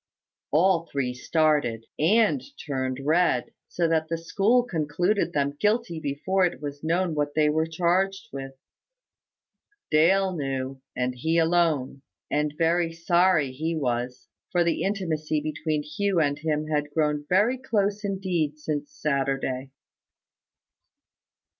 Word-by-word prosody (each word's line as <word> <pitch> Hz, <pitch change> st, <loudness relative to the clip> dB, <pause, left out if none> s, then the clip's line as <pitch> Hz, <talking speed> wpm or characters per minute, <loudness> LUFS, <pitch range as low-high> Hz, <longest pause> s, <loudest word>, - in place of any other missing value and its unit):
All 170 Hz, +2 st, +3 dB
three 130 Hz, -3 st, -1 dB
started, 145 Hz, -4 st, +1 dB
and 220 Hz, -, +3 dB, 0.2 s
turned 130 Hz, -3 st, -2 dB
red; 160 Hz, -5 st, +2 dB, 0.2 s
so 170 Hz, -1 st, 0 dB
that 160 Hz, -1 st, +1 dB
the 165 Hz, -, -1 dB
school 205 Hz, +9 st, +2 dB
concluded 175 Hz, 0 st, 0 dB
them 140 Hz, -1 st, 0 dB
guilty 210 Hz, -5 st, +1 dB
before 160 Hz, +7 st, 0 dB
it 180 Hz, -, 0 dB
was 145 Hz, 0 st, -7 dB
known 170 Hz, +2 st, +1 dB
what 145 Hz, -1 st, -1 dB
they 155 Hz, -1 st, +4 dB
were 160 Hz, +1 st, +1 dB
charged 190 Hz, +6 st, 0 dB
with. 135 Hz, 0 st, -6 dB, 1.4 s
Dale 185 Hz, +5 st, +4 dB
knew, 135 Hz, -2 st, -3 dB, 0.2 s
and 125 Hz, 0 st, 0 dB
he 160 Hz, +7 st, 0 dB
alone; 160 Hz, -5 st, +1 dB, 0.3 s
and 150 Hz, 0 st, 0 dB
very 165 Hz, 0 st, +2 dB
sorry 165 Hz, -3 st, +2 dB
he 160 Hz, +5 st, -2 dB
was, 125 Hz, -3 st, -2 dB, 0.2 s
for 175 Hz, -1 st, +3 dB
the 170 Hz, -1 st, 0 dB
intimacy 160 Hz, -6 st, -1 dB
between 150 Hz, 0 st, -2 dB
Hugh 195 Hz, +4 st, 0 dB
and 145 Hz, -2 st, +1 dB
him 155 Hz, -1 st, -1 dB
had 150 Hz, -1 st, -1 dB
grown 150 Hz, -1 st, 0 dB
very 215 Hz, +8 st, +3 dB
close 210 Hz, -4 st, 0 dB
indeed 185 Hz, -7 st, -1 dB
since 145 Hz, -1 st, -4 dB
Saturday. 135 Hz, -2 st, -1 dB
155 Hz, 130 wpm, -26 LUFS, 145-180 Hz, 1.4 s, they